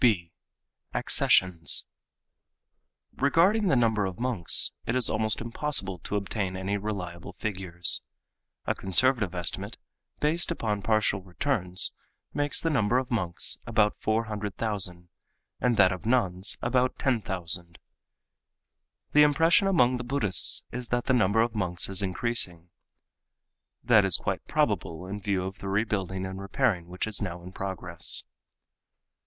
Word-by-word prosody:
(b) 95 Hz, -9 st, +2 dB, 0.6 s
Accessions.—Regarding 140 Hz, -, 0 dB
the 170 Hz, -, +3 dB
number 110 Hz, -4 st, +1 dB
of 90 Hz, -1 st, -7 dB
monks 120 Hz, -9 st, +4 dB, 0.2 s
it 115 Hz, -, -1 dB
is 130 Hz, -2 st, +2 dB
almost 110 Hz, 0 st, 0 dB
impossible 115 Hz, -6 st, -1 dB
to 105 Hz, -, -5 dB
obtain 100 Hz, -2 st, -3 dB
any 95 Hz, +2 st, -3 dB
reliable 95 Hz, -4 st, -6 dB
figures. 90 Hz, -5 st, +3 dB, 0.6 s
A -, -, 0 dB
conservative 100 Hz, +1 st, +1 dB
estimate, 90 Hz, -1 st, -4 dB, 0.4 s
based 160 Hz, +4 st, +2 dB
upon 110 Hz, -11 st, -2 dB
partial 110 Hz, -2 st, 0 dB
returns, 90 Hz, -1 st, +2 dB, 0.4 s
makes 145 Hz, 0 st, 0 dB
the 165 Hz, -, 0 dB
number 120 Hz, -3 st, +1 dB
of 130 Hz, -1 st, -3 dB
monks 90 Hz, -7 st, 0 dB
about 110 Hz, -2 st, +1 dB
400,000 105 Hz, -5 st, -3 dB, 0.5 s
and 120 Hz, -3 st, +1 dB
that 95 Hz, -2 st, +5 dB
of 95 Hz, +3 st, -6 dB
nuns 100 Hz, -6 st, +1 dB
about 125 Hz, +1 st, 0 dB
10,000. 90 Hz, -8 st, -2 dB, 1.3 s
The 150 Hz, -, +5 dB
impression 165 Hz, +6 st, +4 dB
among 130 Hz, -10 st, +2 dB
the 125 Hz, -, -6 dB
Buddhists 120 Hz, -7 st, +1 dB
is 125 Hz, 0 st, -6 dB
that 120 Hz, +1 st, -1 dB
the 130 Hz, -, +1 dB
number 110 Hz, -2 st, +2 dB
of 115 Hz, -1 st, -3 dB
monks 90 Hz, -5 st, 0 dB
is 95 Hz, 0 st, -2 dB
increasing. 90 Hz, -4 st, 0 dB, 1.1 s
That 115 Hz, -4 st, +5 dB
is 95 Hz, -3 st, +3 dB
quite -, -, -4 dB
probable 85 Hz, +2 st, -1 dB
in 100 Hz, +2 st, -7 dB
view 95 Hz, -2 st, -1 dB
of 95 Hz, +1 st, -7 dB
the 95 Hz, -, -6 dB
rebuilding 95 Hz, -2 st, -2 dB
and 95 Hz, +1 st, -7 dB
repairing 100 Hz, -4 st, -1 dB
which 90 Hz, +1 st, -4 dB
is 110 Hz, -2 st, -2 dB
now 90 Hz, -3 st, -5 dB
in 90 Hz, -, -10 dB
progress. 95 Hz, -3 st, -3 dB
105 Hz, 130 wpm, -27 LUFS, 95-120 Hz, 1.3 s, that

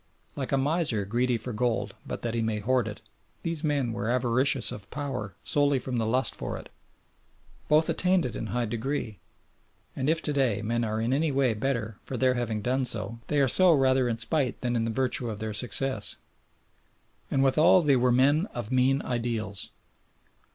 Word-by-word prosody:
Like 135 Hz, -3 st, -4 dB
a 135 Hz, -, +2 dB
miser 140 Hz, -, 0 dB
greedy 120 Hz, +4 st, 0 dB
for 120 Hz, +2 st, -5 dB
gold 120 Hz, +1 st, -1 dB
but -, -, -6 dB
that 115 Hz, -1 st, -2 dB
he 115 Hz, -, -1 dB
may 110 Hz, -1 st, -1 dB
hoard 120 Hz, +2 st, 0 dB
it, 105 Hz, +1 st, -7 dB, 0.4 s
these 165 Hz, -2 st, -2 dB
men 140 Hz, -6 st, 0 dB
were 110 Hz, 0 st, -3 dB
avaricious 125 Hz, +2 st, +2 dB
of 100 Hz, -2 st, -8 dB
power 130 Hz, -, -5 dB
solely 145 Hz, -1 st, +2 dB
from 125 Hz, -1 st, -3 dB
the 110 Hz, -, -1 dB
lust 130 Hz, +4 st, +1 dB
for -, -, -5 dB
it; -, -, -11 dB, 1.0 s
both 155 Hz, +1 st, +4 dB
attained 185 Hz, -3 st, +1 dB
it 120 Hz, -, -4 dB
in 110 Hz, -, -4 dB
high 120 Hz, +2 st, -1 dB
degree, 115 Hz, -2 st, -4 dB, 0.8 s
and 130 Hz, +2 st, -1 dB
if 160 Hz, 0 st, +2 dB
to 150 Hz, -, -1 dB
day 120 Hz, -7 st, 0 dB
men 120 Hz, +2 st, -1 dB
are 110 Hz, -1 st, -2 dB
in 115 Hz, +3 st, 0 dB
any 150 Hz, +2 st, +1 dB
way 135 Hz, -3 st, +2 dB
better 110 Hz, -2 st, -3 dB
for 130 Hz, -, -5 dB
their 130 Hz, +2 st, +3 dB
having 115 Hz, -4 st, -3 dB
done 130 Hz, +3 st, 0 dB
so 115 Hz, -1 st, -2 dB
they 150 Hz, -, +1 dB
are 135 Hz, -, +4 dB
so 180 Hz, +6 st, +7 dB
rather 130 Hz, -3 st, +2 dB
in 115 Hz, -, -2 dB
spite 130 Hz, +2 st, 0 dB
than 120 Hz, -1 st, -1 dB
in 115 Hz, -1 st, 0 dB
virtue 125 Hz, 0 st, -1 dB
of 110 Hz, -, -5 dB
their 110 Hz, 0 st, -4 dB
success. 125 Hz, 0 st, +1 dB, 1.1 s
And 135 Hz, -, +1 dB
withal 155 Hz, +6 st, +5 dB
they 145 Hz, -3 st, +4 dB
were 125 Hz, 0 st, +2 dB
men 145 Hz, -, +3 dB
of 120 Hz, -2 st, -4 dB
mean 130 Hz, +2 st, +2 dB
ideals. 115 Hz, -5 st, -3 dB
125 Hz, 190 wpm, -27 LUFS, 115-135 Hz, 1.1 s, so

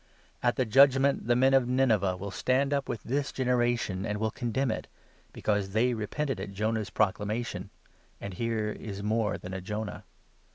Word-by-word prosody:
At 120 Hz, -1 st, +2 dB
the 130 Hz, -, +1 dB
Judgement, 135 Hz, +2 st, +4 dB
the 120 Hz, -, +4 dB
men 130 Hz, +2 st, +4 dB
of 130 Hz, -2 st, +4 dB
Nineveh 110 Hz, -8 st, +2 dB
will 100 Hz, +1 st, -6 dB
stand 135 Hz, +6 st, +1 dB
up 140 Hz, -1 st, -1 dB
with 110 Hz, -, -4 dB
this 140 Hz, +3 st, -1 dB
41 -, -, -12 dB
generation, 120 Hz, -6 st, +1 dB
and 105 Hz, -, -2 dB
will 110 Hz, +1 st, -1 dB
condemn 120 Hz, +2 st, -1 dB
it, -, -, -4 dB, 0.4 s
because 100 Hz, -2 st, -1 dB
they 120 Hz, +3 st, +3 dB
repented 120 Hz, +4 st, -2 dB
at 100 Hz, +1 st, -6 dB
Jonah's 110 Hz, +1 st, -1 dB
proclamation; 105 Hz, -1 st, -1 dB, 0.5 s
and 100 Hz, -, -6 dB
here 110 Hz, +1 st, -1 dB
is 100 Hz, -2 st, -7 dB
more 110 Hz, 0 st, 0 dB
than 90 Hz, -, -8 dB
a 95 Hz, -, -4 dB
Jonah 105 Hz, +2 st, -5 dB
110 Hz, 175 wpm, -29 LUFS, 105-125 Hz, 0.5 s, Judgement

